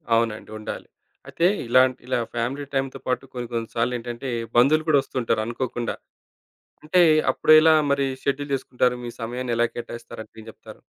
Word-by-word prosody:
అవునండి 115 -2 -1
ఉండాలి. 110 - -7 0.4
అయితే 170 - +1 0.2
ఇలాంటి, 130 +1 +4
ఇలా 130 -1 0 0.2
ఫ్యామిలీ 125 +5 -2
టైమ్ంతో 135 -1 -2
పాటు 130 +1 0
కొన్ని 125 -1 -5
కొన్ని 115 -1 -3
సార్లు 120 +1 0
ఏంటంటే 120 +2 -6 0.3
బంధువులు 155 +6 +4
కూడా 145 -2 +5
ఒస్తుంటారు 115 -3 -1
అనుకోకుండా. 120 0 -3 0.9
అంటే 170 +4 +3 0.3
అప్పుడెలా 155 +1 +6 0.2
మరి 140 -1 +2 0.2
షెడ్యూల్ 140 +1 -2
జేసుకుంటారు? 125 -2 0
మీ 120 - -4
సమయాన్ని 120 +1 -3
ఎలా 120 +1 +3
కేటాయిస్తారంటె 115 -2 -9
ఏం - - -16
జెప్తారు? - - -15
125 Hz, 150 wpm, -24 LUFS, 115-135 Hz, 0.9 s, అప్పుడెలా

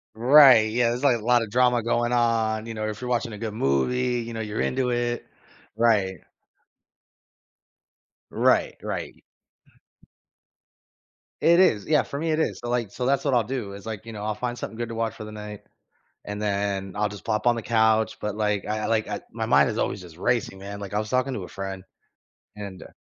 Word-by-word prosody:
Right, 125 -2 +7
yeah, 120 +1 +2
there's, 120 +3 -3
like, 130 -4 +4
a - - -11
lotta 120 -1 +3
drama 125 +1 +2
going 120 +1 0
on, 115 -2 +1
you 115 - -6
know, 110 -1 -3
if 105 -1 -5
you're 125 - -5
watching 120 -1 0
a - - -7
good 110 0 -4
movie, 120 - +1
you 115 0 -7
know, 115 - -5
you're 105 -1 -4
into 130 -1 0
it. 120 0 -1 0.5
Right. 105 -6 +2 2.1
Right, - - +2
right. - - -5 2.2
It 170 +1 +5
is 105 - +3
yeah, 150 -3 +3
for 140 - -6
me, 160 +1 -1
it 155 - +1
is, 160 - -1
so 120 - -6
like 120 -4 -1
so, 125 - -4
that's 135 +1 +1
what 140 - +1
I'll 120 -2 +4
do 120 -4 -4
is, 100 0 -10
like, 110 -1 -6
you 115 - -8
know, 105 -2 -7
I'll 105 0 -2
find 120 +2 -4
something 110 - -6
good 120 0 -3
to 115 - -6
watch 115 0 -2
for 110 - -8
the 110 - -8
night, 105 -1 -8 0.6
and 105 0 -5
then, 100 -2 -1
I'll 105 0 0
just 105 -1 -10
plop 110 0 -1
on 120 - +5
the 115 - -4
couch, 110 0 +2
but, 105 -1 -3
like, 105 -2 0
I 105 +1 -2
I, - - -2
like, 110 -1 +1
I - - -4
my - - -3
mind - - +4
is - - -4
always - - -1
just 85 -3 -13
racing, 120 -1 0
man, 100 +1 -8
like, 100 -1 -7
I - - +2
was 110 0 -4
talking 130 +1 +1
to 100 - -5
a - - -8
friend, 95 -1 -6 0.7
and, 100 -3 -8
uh - - -12
110 Hz, 215 wpm, -25 LUFS, 105-120 Hz, 2.2 s, Right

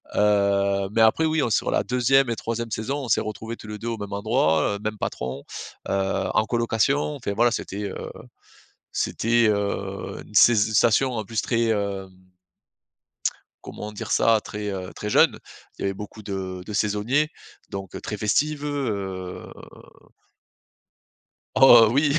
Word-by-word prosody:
Heu, 100 -1 +2
mais 115 - +3
après, 110 +8 +4
oui, 160 -1 +1
on 120 - 0
se 105 - +3
sur - - -2
la - - +2
2e 125 +1 +3
et 115 - 0
3e 115 0 -4
saison, 115 +7 -2
on - - -7
s'est 115 - +3
retrouvés 110 +2 -5
tous 110 - -12
les 105 - -5
2 115 +3 -7
au 115 - -2
même 100 -1 -7
endroit, 100 - +1
heu, - - -6
même 110 0 -3
patron, 65 -6 -4 0.5
heu, - - 0 0.4
en 105 - +3
colocation, 115 +3 +1 0.2
enfin 115 -7 -4
voilà, 120 +3 +4
c'était, 105 -2 -4
heu, - - -7 0.8
c'était, 115 0 +1
heu, 100 -1 -3
une - - -17
saiso 110 0 +6
une - - -5
station 120 +5 +4
en 110 -2 -3
plus 115 +1 -2
très, 115 -1 +1
hem 100 -3 -1 1.5
comment 105 - -7
dire 105 - -6
ça, 115 -1 +4
très, 105 0 -5
heu, 95 -1 -5
très 105 - -4
jeune. - - +4 0.4
Il - - -11
y - - -1
avait 95 - 0
beaucoup 105 +2 -9
de 95 -2 -5
de 105 - -7
saisonniers, 105 +9 +1 0.4
donc 95 -1 -7
heu, - - -6
très 105 - -5
festive, 145 +8 0
heu 100 -10 -3 2.1
Oh 120 -4 +8
oui! 145 +3 +3
105 Hz, 170 wpm, -24 LUFS, 100-120 Hz, 2.1 s, Oh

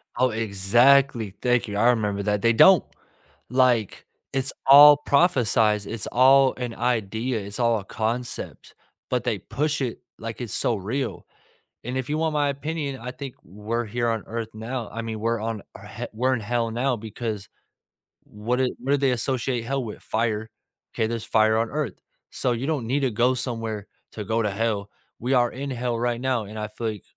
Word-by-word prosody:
Oh, 130 0 +2
exactly, 115 +2 +3
thank 125 -2 +2
you, 100 - -4
I 115 +4 +4
remember 105 -4 0
that. 105 0 0
They 115 0 +3
don't, 180 +7 +7 0.7
like, 125 -5 +1 0.3
it's 135 0 -1
all 145 +1 +10
prophesied. 120 - +2
It's 115 -2 -2
all 130 +2 +5
an 125 -2 -4
idea. 115 0 -1
It's 100 +3 -6
all 115 -2 +2
a - - -9
concept. 115 +4 -4 0.3
But 125 -2 0
they 115 -5 -1
push 150 - -2
it 125 -4 -3 0.2
like 115 0 -6
it's 120 -5 -3
so 120 - +2
real. 110 +2 -4 0.6
And 125 +2 -5
if 130 - -4
you 150 - -1
want 160 0 0
my 145 -1 +2
opinion, 140 -1 -4
I 125 +2 -5
think 135 0 -8
we're 105 +6 -4
here 120 +2 -1
on 115 -2 -1
earth 115 -1 -4
now. 115 +2 -5
I 115 - -4
mean, 110 -1 -5
we're 115 0 0
on 110 -2 -3 0.3
he 120 - -4
we're 125 +4 0
in - - -1
hell 115 +2 -1
now 125 +3 0
because 110 -1 -5 0.8
what 115 +4 -3
i - - +3
what 140 +3 +1
they 135 -1 +2
what 125 - +2
associate 125 0 -1
hell 135 +3 -2
with? 110 -3 -8
Fire. 110 -1 -1 0.4
'Kay, 110 - 0
there's 115 -1 -3
fire 110 0 +3
on 115 0 0
earth, 145 -8 -3 0.4
so, 125 - 0
you 120 +2 -2
don't 150 -7 -1
need 135 +4 +1
to 135 - +2
go 120 +4 +2
somewhere 115 -5 -3 0.2
to 105 - -6
go 110 +3 0
to 105 - 0
hell. 105 -1 -2 0.3
We 125 +4 -1
are 120 -2 +3
in 140 +2 -5
hell 120 -1 -2
right 120 0 -1
now 130 -3 0
and 105 +2 -9
I 105 - -3
feel 115 +2 -5
like 105 -3 -10
115 Hz, 190 wpm, -24 LUFS, 110-130 Hz, 0.8 s, all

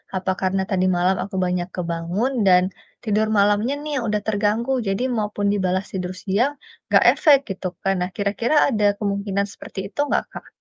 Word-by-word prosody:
apa 190 0 -1
karena 190 0 +1
tadi 185 -1 +2
malam 180 +2 +2
aku 195 0 -8
banyak 180 0 -1
kebangun 175 +7 -2 0.2
dan 180 -1 +6 0.4
tidur 215 0 +1
malamnya 205 +6 +3
nih 300 -1 -3
udah 210 -1 0
terganggu 220 +4 0 0.2
jadi 195 +6 0
maupun 210 -1 -2
dibalas 185 -1 0
tidur 185 -1 -3
siang 230 +9 +1 0.4
gak - - +6
efek," 295 -4 +5
gitu 190 -1 -4 0.2
kan. 195 - +2
Nah, 180 - -1
kira-kira 210 +7 0
ada 215 -6 0 0.2
kemungkinan 200 -1 -1
seperti - - -9
itu - - -15 0.2
gak, - - +1
Kak? - - -9
200 Hz, 170 wpm, -22 LUFS, 185-215 Hz, 0.4 s, dan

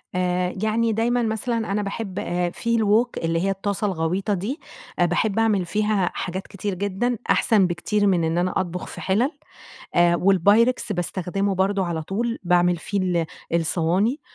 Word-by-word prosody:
آآ، 180 0 0
يعني 225 +1 +1
دايمًا 235 +2 +1
مثلًا 225 0 -1
أنا 210 +1 0
باحب 200 -1 -4 0.3
في 235 0 -1
الووك 225 +2 +2
اللي 165 0 0
هي 195 - +1
الطاسة 200 +1 -2
الغويطة 185 +3 -1
دي، 210 - -3 0.4
باحب 195 +5 +1
أعمل 210 -5 +2
فيها 210 -1 0
حاجات 190 +1 -4
كتير 200 0 -4
جدًا، 205 +6 -1
أحسن 205 -5 +4
بكتير 205 +4 0
من 180 -4 +2
إن 165 +1 0
أنا 180 +1 0
أطبخ 180 -1 -3
في - - -8
حِلَل، 225 +9 +1 0.6
آآ، 175 0 +4
والبايركس 205 +6 +3
باستخدمه 190 +2 -2
برضه 190 +1 +1
على 170 -2 -3
طول، 230 +8 -2
باعمل 175 -1 +3
فيه 200 +4 -3
ال 175 -3 0 0.3
الصواني، 175 - +1
195 Hz, 155 wpm, -23 LUFS, 180-215 Hz, 0.6 s, أحسن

